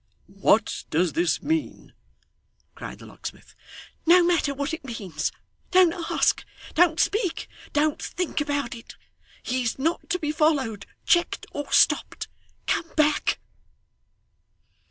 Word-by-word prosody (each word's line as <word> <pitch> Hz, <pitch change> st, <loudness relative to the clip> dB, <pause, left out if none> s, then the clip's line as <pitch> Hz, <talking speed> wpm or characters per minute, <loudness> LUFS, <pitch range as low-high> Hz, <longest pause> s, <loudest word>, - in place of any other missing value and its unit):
'What 200 Hz, +2 st, +1 dB
does 165 Hz, 0 st, +1 dB
this 170 Hz, -3 st, +1 dB
mean?' 320 Hz, 0 st, -2 dB, 0.8 s
cried -, -, -8 dB
the -, -, -13 dB
locksmith. -, -, -9 dB, 0.5 s
'No 355 Hz, +1 st, +7 dB
matter 340 Hz, -4 st, +2 dB
what 280 Hz, +3 st, -3 dB
it 320 Hz, -, -5 dB
means, 200 Hz, -, -3 dB, 0.4 s
don't 365 Hz, -2 st, +5 dB
ask, 335 Hz, -2 st, +1 dB, 0.3 s
don't 335 Hz, -1 st, +4 dB
speak, 400 Hz, -5 st, 0 dB, 0.2 s
don't 295 Hz, 0 st, +1 dB
think 350 Hz, -3 st, -2 dB
about 285 Hz, -4 st, -1 dB
it. 230 Hz, -1 st, -11 dB, 0.5 s
He 255 Hz, +1 st, -1 dB
is 235 Hz, -2 st, -1 dB
not 325 Hz, +6 st, -1 dB
to 360 Hz, -, +1 dB
be 300 Hz, -4 st, -2 dB
followed, 295 Hz, -9 st, +1 dB, 0.2 s
checked, 345 Hz, -1 st, +2 dB
or 290 Hz, -, -5 dB
stopped. -, -, +3 dB, 0.4 s
Come 330 Hz, -, -1 dB
back! 300 Hz, -1 st, +3 dB
295 Hz, 125 wpm, -25 LUFS, 240-335 Hz, 0.8 s, No